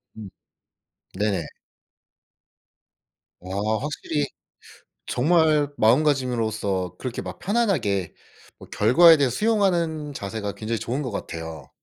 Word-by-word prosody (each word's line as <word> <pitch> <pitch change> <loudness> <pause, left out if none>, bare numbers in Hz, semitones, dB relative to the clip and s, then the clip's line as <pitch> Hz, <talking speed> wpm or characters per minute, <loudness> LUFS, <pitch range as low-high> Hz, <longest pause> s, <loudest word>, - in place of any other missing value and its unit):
음 105 -3 -9 0.9
네네. 100 -7 0 1.9
와 100 +4 -2
확실히 150 0 -2 0.8
정말 155 +1 +3
마음가짐으로서 110 - +1
그렇게 125 -2 -4
막 - - -8
편안하게 165 - 0 0.5
뭐 - - -12
결과에 160 +10 +6
대해 140 -3 +2
수용하는 170 - 0
자세가 105 -2 -5
굉장히 110 0 -3
좋은 120 +6 -3
것 125 -5 -4
같아요. 80 -4 -7
125 Hz, 235 characters per minute, -24 LUFS, 105-155 Hz, 1.9 s, 결과에